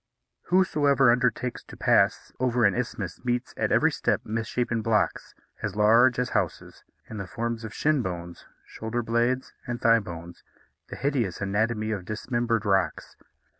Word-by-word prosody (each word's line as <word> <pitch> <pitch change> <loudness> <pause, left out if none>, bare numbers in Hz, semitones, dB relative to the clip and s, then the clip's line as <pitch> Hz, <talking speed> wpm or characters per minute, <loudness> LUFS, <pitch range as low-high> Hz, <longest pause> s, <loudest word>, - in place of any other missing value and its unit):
Whosoever 145 -8 +4
undertakes 125 0 0
to - - -12
pass - - +2
over 125 -2 +2
an 100 - +4
isthmus 110 -7 -4
meets 120 0 -2
at - - -1
every - - +4
step - - 0
misshapen 115 +1 -2
blocks, 110 -1 0 0.3
as 105 -3 -3
large 115 +4 +5
as 125 0 0
houses, - - -3 0.2
in 110 - -8
the 100 -2 -5
forms 115 +5 -3
of 110 - -6
shin 150 +4 +1
bones, 85 -4 -6 0.2
shoulder 115 +2 -4
blades, 120 +3 0
and 120 -1 -3
thigh 115 0 +5
bones, 85 -3 -9 0.5
the - - -6
hideous 130 - -1
anatomy 110 +2 0
of 100 -4 -4
dismembered 115 +1 -1
rocks. 95 -5 0
115 Hz, 150 wpm, -26 LUFS, 105-125 Hz, 0.5 s, large